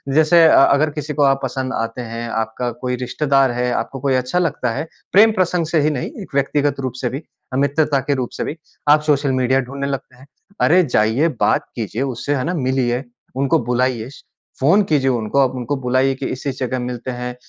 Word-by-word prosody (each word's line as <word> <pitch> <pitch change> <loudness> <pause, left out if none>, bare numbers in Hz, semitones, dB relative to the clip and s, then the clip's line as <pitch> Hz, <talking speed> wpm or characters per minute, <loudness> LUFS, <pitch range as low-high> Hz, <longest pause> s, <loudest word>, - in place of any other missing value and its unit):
जैसे 160 +2 +5
अ, - - +5
अगर 145 +3 +3
किसी 150 0 -5
को 145 - +1
आप 135 -1 +3
पसंद 130 0 -3
आते 115 +2 -3
हैं, 115 0 -5
आपका 115 +2 -2
कोई 125 +2 -3
रिश्तेदार 135 +1 +1
है, 125 +1 -1
आपको 135 - -3
कोई 135 0 +1
अच्छा 130 +7 0
लगता 145 -8 -1
है, 160 - -4 0.3
प्रेम 220 +3 +7
प्रसंग 180 -3 +1
से 165 0 +1
ही 150 - +2
नहीं, 135 -4 -3
एक - - -12
व्यक्तिगत 140 +1 +1
रूप 130 -3 -3
से 125 - 0
भी 135 +6 -6 0.3
अ, - - -1
मित्रता 140 +1 +2
के 140 - +3
रूप 125 -2 -2
से - - -2
भी 155 - -5 0.3
आप 150 +1 +6
सोशल 140 -1 +1
मीडिया 130 +1 +2
ढूँढने 140 +2 -5
लगते 135 -2 -5
हैं। 130 +2 -17 0.3
अरे 180 +3 +5
जाइए 120 +1 +2
बात - - +2
कीजिए 115 +1 -4
उससे, 140 +2 -2
है 130 - -1
ना। 175 - -1
मिलिए, 130 -3 0 0.3
उनको 135 0 +2
बुलाइए, 125 -1 0 0.5
फ़ोन 165 +10 +4
कीजिए 140 -4 +2
उनको 120 +1 0
आप, 135 -2 +3
उनको 130 +3 -2
बुलाइए 130 +2 +2
कि 135 - -6
इस 130 - -6
इस 135 -2 -3
जगह 130 0 -2
मिलते 125 0 -4
हैं। 125 0 -5
135 Hz, 215 wpm, -19 LUFS, 125-145 Hz, 0.5 s, प्रेम